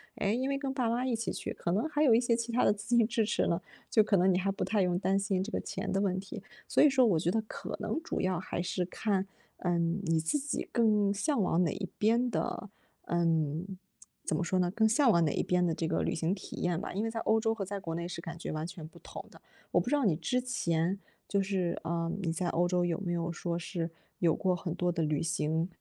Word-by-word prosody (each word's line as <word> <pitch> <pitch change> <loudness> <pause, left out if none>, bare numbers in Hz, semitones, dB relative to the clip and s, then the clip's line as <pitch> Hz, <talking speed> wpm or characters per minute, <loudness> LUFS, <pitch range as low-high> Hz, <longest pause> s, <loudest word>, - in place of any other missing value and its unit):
哎， 200 - 0
因 250 +4 0
为 275 0 0
跟 275 -1 -3
爸 250 -4 0
妈 240 +2 0
一 255 - 0
起 230 0 -2
去， - - -4
可 170 - -2
能 220 +11 0
还 295 0 +1
有 245 -7 +6
一 235 - +4
些 235 -2 +2
其 235 0 -3
他 250 - +3
的 - - +5
资 210 +4 -1
金 235 -2 +6
支 220 0 +1
持 210 - +1
呢， 170 +2 0 0.3
就 220 - +6
可 210 -1 +2
能 185 0 +4
你 - - +2
还 195 +1 0
不 195 - -2
太 210 -2 +1
用 180 -1 +2
担 195 +1 +1
心 195 -1 0
这 220 - -6
个 - - -1
钱 - - -4
的 195 - +1
问 195 -2 +1
题。 195 +1 -6 0.3
所 - - +4
以 300 - +8
说 265 -2 +4
我 185 -8 +3
觉 165 - 0
得 220 +4 +1
可 215 - -6
能 320 - -2
主 - - -2
要 185 -1 +1
还 175 - -3
是 180 0 -1
看， 195 +1 -1 0.3
嗯， 170 0 0
你 165 -3 +2
自 160 - 0
己 285 0 -3
更 210 -4 +3
向 220 +5 0
往 180 -2 +2
哪 165 - +1
一 190 - -4
边 235 +4 +3
的， 210 -2 -3 0.3
嗯， 165 -1 +1 0.6
怎 - - 0
么 - - 0
说 185 +2 0
呢， 180 -1 +2
更 220 +4 +3
向 250 +4 +4
往 170 -6 +5
哪 150 - +1
一 - - +1
边 180 0 +2
的 170 - +1
这 160 +1 -2
个 - - 0
旅 - - 0
行 165 +4 0
体 190 - -9
验 175 -2 0
吧。 - - -5
因 200 +4 -1
为 - - -1
在 225 0 -4
欧 220 0 +3
洲 225 0 +1
和 210 - -3
在 200 +1 -4
国 165 -4 -4
内 170 0 -3
是 175 - -6
感 170 0 -7
觉 170 - -5
完 155 +1 -3
全 175 -3 -8
不 - - -16
同 - - -9
的。 - - -16 0.3
我 - - +4
不 - - -2
知 295 - +3
道 290 - +1
你 180 -6 +3
之 170 +11 0
前 185 -7 0 0.3
就 200 - +1
是 190 -3 -1
啊， 165 0 -1
你 170 -3 0
在 175 +2 -2
欧 175 +2 +2
洲 180 0 +1
有 170 0 -1
没 180 -3 -2
有 170 0 -1
说 170 +1 -2
是 170 0 -3 0.3
有 165 -3 +3
过 185 -1 +1
很 170 -1 -4
多 180 0 +1
的 165 - -1
旅 155 -1 0
行， 160 +1 0
185 Hz, 290 characters per minute, -31 LUFS, 170-225 Hz, 0.6 s, 以